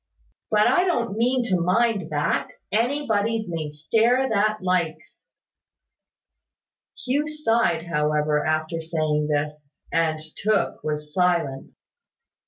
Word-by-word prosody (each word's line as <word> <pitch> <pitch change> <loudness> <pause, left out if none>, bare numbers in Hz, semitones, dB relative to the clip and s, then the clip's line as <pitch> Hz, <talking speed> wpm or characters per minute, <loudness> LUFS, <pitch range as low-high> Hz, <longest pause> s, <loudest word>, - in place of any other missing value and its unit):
But 210 0 +4
I 360 - +4
don't 240 - 0
mean 245 +3 +2
to 180 -2 +2
mind 195 0 +1
that. 150 +2 0 0.2
Anybody 225 -2 0
may 165 -3 -3
stare 230 - +2
that 215 -1 +1
likes." 180 -3 -2 1.8
Hugh 285 +4 0
sighed, 230 - +1
however, 150 -2 +1
after 155 +1 -1
saying 155 -2 -1
this; 150 -1 -2 0.2
and 160 -1 +1 0.2
Tooke 215 0 0
was 150 -1 -4
silent. 170 -7 0
175 Hz, 105 wpm, -24 LUFS, 155-225 Hz, 1.8 s, But